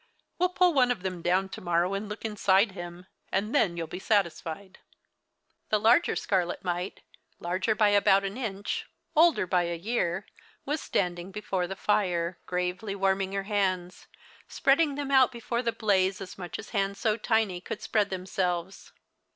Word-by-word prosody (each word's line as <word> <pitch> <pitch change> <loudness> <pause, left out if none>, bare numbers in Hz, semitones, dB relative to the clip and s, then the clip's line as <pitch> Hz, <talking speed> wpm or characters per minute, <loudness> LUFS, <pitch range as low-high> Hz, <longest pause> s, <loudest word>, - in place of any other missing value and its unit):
We'll 360 +1 +3
pull 360 -1 +3
one 255 -3 +4
of 240 -7 -1
them 185 -2 -3
down 185 +3 +1
to 195 - -8
mor 170 -1 +2
row 180 +3 -1
and 200 +2 -3
look 210 +2 -6
inside 200 -1 +3
him; 175 -1 -8 0.3
and 205 +4 -1
then 185 -12 +2
you'll 165 - -2
be 180 - -7
satisfied." 190 -2 -1 0.9
The 215 - +3
larger 235 +10 +4
scarlet 180 -3 -1
mite, 180 0 -3 0.4
larger 185 +5 -1
by 210 -1 +4
about 200 -1 +4
an 195 +1 -3
inch, 205 -6 -3 0.3
older 325 - +5
by 180 -1 +1
a 170 0 -3
year, 190 -1 -1 0.4
was 295 +2 -1
standing 175 -1 -1
be 210 - -5
fore 185 -3 -1
the 195 - -5
fire, 180 -4 0
gravely 180 +3 -2
warming 195 0 0
her 195 0 -1
hands, 190 -3 -1 0.4
spreading 285 +1 +2
them 285 -1 -3
out 260 -2 +6
before 235 0 -3
the 235 -2 0
blaze 195 -3 +1
as 190 -2 -8
much 180 -2 -6
as - - -10
hands 200 -2 0
so 215 -2 +1
tiny 215 -5 0
could 210 +3 -6
spread 210 -2 +1
them 185 -1 -5
selves. 180 -1 -2
195 Hz, 175 wpm, -28 LUFS, 180-220 Hz, 0.9 s, out